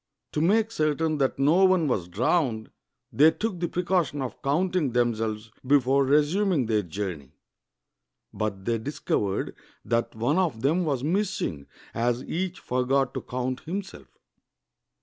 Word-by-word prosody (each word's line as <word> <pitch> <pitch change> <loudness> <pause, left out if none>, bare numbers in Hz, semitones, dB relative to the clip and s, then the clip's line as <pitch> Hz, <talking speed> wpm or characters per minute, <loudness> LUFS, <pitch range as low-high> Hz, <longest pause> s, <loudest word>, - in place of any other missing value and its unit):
To 150 - -1
make 220 +6 +3
certain 155 -4 0
that 135 -1 +1
no 155 +8 +4
one 185 -4 +4
was 100 -10 -1
drowned, 115 - 0 0.4
they 150 +3 +7
took 205 +1 -3
the 175 - 0
precaution 175 -4 0
of 125 - -7
counting 160 -1 0
themselves 110 -2 -1
before 135 0 +3
resuming 150 +2 +2
their 110 -1 +1
journey; 90 -6 -6 1.0
but 100 -3 -3
they 115 -1 0
discovered 105 -6 -2 0.3
that 115 -1 -1
one 125 +10 +1
of 160 -12 0
them 165 +6 +2
was 135 -5 -1
miss 190 +5 0
ing, 70 -5 -4 0.3
as 120 +2 0
each 185 +1 -3
forgot 130 +1 0
to - - -3
count 130 +1 -3
himself. 175 - -6
140 Hz, 140 wpm, -26 LUFS, 115-170 Hz, 1.0 s, they